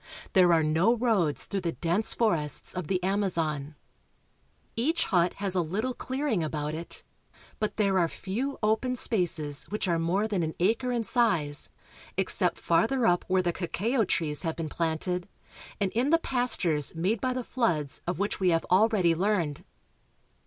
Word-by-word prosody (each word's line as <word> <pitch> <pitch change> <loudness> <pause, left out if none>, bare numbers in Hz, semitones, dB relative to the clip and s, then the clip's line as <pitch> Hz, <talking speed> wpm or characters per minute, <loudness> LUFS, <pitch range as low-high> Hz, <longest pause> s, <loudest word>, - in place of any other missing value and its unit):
There 180 -4 +6
are 165 -2 +4
no 165 +10 +3
roads 220 - +1
through 195 -1 -3
the 170 -2 -2
dense 175 +6 0
forests 165 - 0
of 180 -4 -4
the 185 0 -1
Amazon. 165 -7 -1 1.0
Each 305 +9 +1
hut 175 -3 +2
has 195 -2 -1
a 185 - +2
little 210 +10 -2
clearing 260 - -2
about 150 -1 -3
it, 165 +2 -5 0.6
but 215 - -2
there 200 -3 +2
are 170 - +3
few 235 - -4
open 220 +4 +1
spaces 170 - 0
which 210 -1 -3
are 170 -2 +1
more 185 +6 +1
than 200 -5 -1
an 160 -1 -3
acre 225 +7 +1
in 240 -2 0
size, 190 - +1 0.5
except - - +1
farther 265 -3 +1
up 175 -4 +2
where 185 0 +2
the 175 -1 0
cacao 220 +8 0
trees 155 -6 -1
have 165 -3 -1
been 165 -2 -4
planted, 175 +4 -2 0.5
and 195 -2 0
in 245 +5 +1
the 330 - +5
pastures 190 - +1
made 190 +7 0
by 255 - 0
the 255 0 -3
floods 165 - -1
of 175 - -1
which 200 +2 -2
we 185 -2 +3
have 165 -1 +1
already 190 -3 +4
learned. 170 -5 0
185 Hz, 165 wpm, -28 LUFS, 165-220 Hz, 1.0 s, There